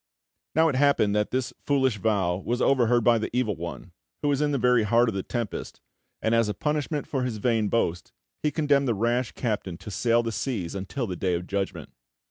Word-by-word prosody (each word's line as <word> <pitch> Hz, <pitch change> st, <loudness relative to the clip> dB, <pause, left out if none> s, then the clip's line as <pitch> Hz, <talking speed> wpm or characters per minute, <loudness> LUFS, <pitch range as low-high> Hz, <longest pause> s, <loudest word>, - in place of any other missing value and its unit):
Now 160 Hz, +1 st, +5 dB
it 155 Hz, -, +1 dB
happened 130 Hz, -7 st, +3 dB
that 105 Hz, 0 st, +1 dB
this 130 Hz, -1 st, -2 dB
foolish 130 Hz, -6 st, +1 dB
vow 100 Hz, -5 st, +1 dB
was 120 Hz, +6 st, -2 dB
over 130 Hz, -4 st, +3 dB
heard 120 Hz, 0 st, +3 dB
by 115 Hz, 0 st, +4 dB
the 110 Hz, -, -3 dB
Evil 110 Hz, -5 st, +1 dB
One, 85 Hz, +1 st, -7 dB, 0.3 s
who 145 Hz, -, +2 dB
was 140 Hz, 0 st, +1 dB
in 150 Hz, -1 st, +1 dB
the 140 Hz, -, +1 dB
very 125 Hz, -1 st, +4 dB
heart 115 Hz, +3 st, +3 dB
of -, -, -3 dB
the 95 Hz, -, -2 dB
tempest, 120 Hz, +1 st, -5 dB, 0.4 s
and, 110 Hz, -, +2 dB
as 115 Hz, -2 st, +3 dB
a 105 Hz, -, -2 dB
punishment 150 Hz, 0 st, -1 dB
for 135 Hz, -, -2 dB
his 125 Hz, -3 st, -2 dB
vain 110 Hz, -1 st, +1 dB
boast, 85 Hz, -7 st, -1 dB, 0.3 s
he 150 Hz, -, +2 dB
condemned 145 Hz, -3 st, +2 dB
the 115 Hz, -, +1 dB
rash 120 Hz, +3 st, 0 dB
captain 105 Hz, -7 st, -3 dB
to 95 Hz, +3 st, -9 dB
sail 115 Hz, +3 st, +2 dB
the 115 Hz, -, -2 dB
seas 110 Hz, -7 st, -3 dB
until 100 Hz, +7 st, -3 dB
the 95 Hz, -4 st, -4 dB
Day 90 Hz, 0 st, 0 dB
of 85 Hz, +1 st, -4 dB
Judgment. 100 Hz, +1 st, -3 dB
115 Hz, 220 wpm, -26 LUFS, 100-130 Hz, 0.4 s, Now